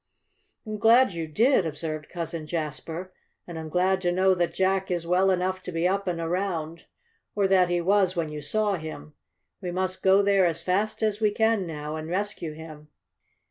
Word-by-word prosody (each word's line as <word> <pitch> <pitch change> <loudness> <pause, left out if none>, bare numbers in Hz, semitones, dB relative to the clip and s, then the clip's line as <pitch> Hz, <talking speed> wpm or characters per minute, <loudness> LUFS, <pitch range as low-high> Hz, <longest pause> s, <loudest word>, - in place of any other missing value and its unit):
"I'm 215 -1 -5
glad 230 0 +5
you 165 -1 -4
did," 225 - +3
observed 155 -1 -5
Cousin 165 -2 -5
Jasper. 165 +3 -5 0.3
"And 170 -2 -7
I'm 160 -1 -6
glad 185 +3 +1
to 175 -1 +1
know 190 +1 +3
that 175 -2 0
Jack 190 0 +1
is 175 -2 -2
well 180 +3 +3
enough 185 0 0
to 180 - -7
be 165 +1 +1
up 195 +1 -1
and 175 -2 -1
around 165 -2 -3 0.5
or 200 -2 +2
that 185 -2 +4
he 175 0 +1
was 190 0 +2
when 165 -3 -1
you 150 0 -6
saw 205 +6 0
him. 155 - -8 0.5
We 180 - -4
must 185 +1 -2
go 195 +1 +5
there 195 -2 +4
as 170 0 -3
fast 205 +5 0
as 215 0 0
we 215 - +4
can 220 -2 +1
now, 150 -1 -5
and 155 +1 -6
rescue 185 -4 -3
him." 155 -1 -11
180 Hz, 190 wpm, -26 LUFS, 165-195 Hz, 0.5 s, glad